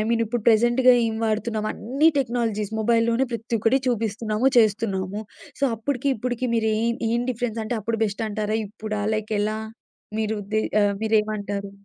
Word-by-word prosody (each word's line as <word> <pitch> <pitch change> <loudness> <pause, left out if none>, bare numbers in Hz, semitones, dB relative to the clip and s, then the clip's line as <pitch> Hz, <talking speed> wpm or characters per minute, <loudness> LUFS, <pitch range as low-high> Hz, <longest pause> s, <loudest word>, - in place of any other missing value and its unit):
Mean 230 0 +2
ఇప్పుడు 230 +1 -3
ప్రెజెంట్‌గా 240 +3 +5
ఏం 220 - -2
వాడుతున్నాం 215 0 -1
అన్ని 275 +8 +2
టెక్నాలజీస్ 230 -5 -1
మొబైల్‌లోనే 230 +3 +2
ప్రతొక్కటి 230 +2 +1
చూపిస్తున్నాము, 225 +1 0
చేస్తున్నాము. 205 -2 +1 0.4
సో - - +3
అప్పడికి, 270 +4 -1
ఇప్పడికి 245 +2 -2
మీరేం 220 +1 +1 0.2
ఏం 235 +1 +1
డిఫరెన్స్ 235 -2 -3
అంటే, 230 +2 -2
అప్పుడు 225 +2 -2
బెస్ట్ 205 +1 -3
అంటారా? 215 +1 -1
ఇప్పుడా? 215 0 -5
లైక్ 215 0 -3
ఎలా 215 +1 0 0.6
మీరు 215 0 -1 0.2
దే 215 - +3 0.2
ఆహ్ 205 0 +2
మీరేమంటారు? 210 -2 0
220 Hz, 140 wpm, -24 LUFS, 215-235 Hz, 0.6 s, ప్రెజెంట్‌గా